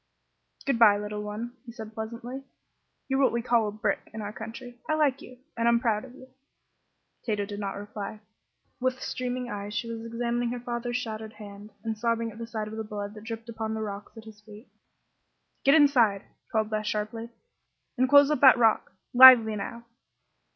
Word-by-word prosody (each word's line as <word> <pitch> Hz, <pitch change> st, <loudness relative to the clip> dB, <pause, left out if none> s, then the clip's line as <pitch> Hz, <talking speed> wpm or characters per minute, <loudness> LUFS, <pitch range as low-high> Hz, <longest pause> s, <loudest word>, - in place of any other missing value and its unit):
"Good 275 Hz, -4 st, 0 dB
bye, 210 Hz, -3 st, +7 dB
little 210 Hz, 0 st, -5 dB
one," 215 Hz, +4 st, -6 dB
he -, -, -7 dB
said, 220 Hz, -2 st, -9 dB
pleasantly; 235 Hz, +4 st, -6 dB, 0.7 s
"you're 270 Hz, 0 st, 0 dB
what 265 Hz, -, +4 dB
we 235 Hz, 0 st, -2 dB
call 235 Hz, -3 st, +2 dB
a -, -, -3 dB
'brick' 210 Hz, -1 st, -2 dB
in 220 Hz, -, -8 dB
our 205 Hz, 0 st, -6 dB
country. 240 Hz, +3 st, -9 dB
I 310 Hz, -, +2 dB
like 290 Hz, -4 st, +1 dB
you, 250 Hz, -, -12 dB, 0.2 s
and 230 Hz, 0 st, 0 dB
I'm 235 Hz, 0 st, +4 dB
proud 225 Hz, -3 st, 0 dB
of 260 Hz, -1 st, -12 dB
you." 260 Hz, -, -14 dB, 1.0 s
Tato 210 Hz, -3 st, -1 dB
did 205 Hz, 0 st, -7 dB
not 200 Hz, -1 st, -4 dB
reply. 205 Hz, +1 st, -7 dB, 0.6 s
With 255 Hz, 0 st, -1 dB
streaming 250 Hz, -1 st, -4 dB
eyes 205 Hz, 0 st, -5 dB
she 230 Hz, -, -2 dB
was 225 Hz, 0 st, -6 dB
examining 235 Hz, +1 st, -2 dB
her 245 Hz, +1 st, -4 dB
father's 240 Hz, 0 st, -3 dB
shattered 220 Hz, -1 st, -6 dB
hand, 205 Hz, -1 st, -11 dB
and 225 Hz, -1 st, -2 dB
sobbing 230 Hz, 0 st, -1 dB
at 230 Hz, +2 st, -8 dB
sight 215 Hz, -2 st, -4 dB
of 220 Hz, +1 st, -7 dB
the 220 Hz, -, -3 dB
blood 205 Hz, -1 st, -6 dB
that 210 Hz, 0 st, -12 dB
dripped 225 Hz, 0 st, -6 dB
upon 220 Hz, -1 st, -4 dB
the 220 Hz, -, -4 dB
rocks 205 Hz, +1 st, -7 dB
at 225 Hz, -, -10 dB
his 215 Hz, -1 st, -14 dB
feet. 210 Hz, +3 st, -14 dB, 1.0 s
"Get 275 Hz, +2 st, +6 dB
inside!" 245 Hz, -10 st, +4 dB, 0.3 s
called 220 Hz, -1 st, 0 dB
Beth, 215 Hz, 0 st, -2 dB
sharply; 215 Hz, +2 st, -3 dB, 0.7 s
"and 255 Hz, 0 st, +1 dB
close 285 Hz, +1 st, +7 dB
up 300 Hz, -, +1 dB
that 265 Hz, -2 st, +8 dB
rock. 225 Hz, -4 st, +2 dB, 0.2 s
Lively, 245 Hz, -4 st, +9 dB
now!" 235 Hz, +3 st, -6 dB
225 Hz, 190 wpm, -27 LUFS, 210-245 Hz, 1.0 s, Lively